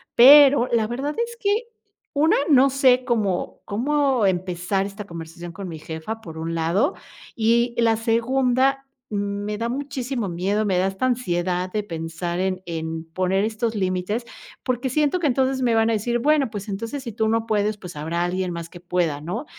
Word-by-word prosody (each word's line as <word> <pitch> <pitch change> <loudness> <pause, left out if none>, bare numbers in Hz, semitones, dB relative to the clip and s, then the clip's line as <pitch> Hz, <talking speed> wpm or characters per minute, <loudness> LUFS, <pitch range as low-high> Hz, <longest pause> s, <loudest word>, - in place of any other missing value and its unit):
Pero 275 0 +8
la 225 -2 +2
verdad 270 +6 -3
es 470 0 -10
que, 415 +3 +1 0.5
una, 310 +3 +3
no 275 -2 +6
sé, 260 -2 +4
cómo 210 -7 -1
cómo 270 +1 +1
empezar 185 +1 -1
esta 200 +1 -7
conversación 170 0 -8
con 190 +3 -7
mi 160 -3 -7
jefa 160 +9 -6
por 165 -6 -10
un 165 +1 -3
lado, 175 - +1 0.4
y 235 +2 +2
la 225 -1 +3
segunda, 255 +4 +2 0.3
me 205 0 -2
da 230 +1 -1
muchísimo 260 -3 -3
miedo, 195 +5 0
me 190 -3 +1
da 185 - +2
esta 195 +6 -2
ansiedad 185 -7 -1
de 210 +1 -1
pensar 170 -1 -4
en 185 0 -1
en 160 -1 -4
poner 185 +2 +1
estos 225 +1 -2
límites, 190 +4 -1 0.4
porque 255 +1 -1
siento 300 +6 +1
que 330 - +1
entonces, 265 0 +1
me 240 -2 +2
van 225 0 +3
a - - +1
decir: 235 +3 0
"Bueno, 285 0 +2
pues, 205 -2 -6
entonces, 230 +7 -4
si 235 - -5
tú 220 +1 0
no 225 0 +1
puedes, 210 -1 0
pues 180 -4 -10
habrá 165 +3 -2
alguien 180 +1 -1
más 170 -1 -5
que 175 - -12
pueda", 170 -4 -1
¿no? 195 - -4
215 Hz, 180 wpm, -23 LUFS, 180-250 Hz, 0.5 s, Pero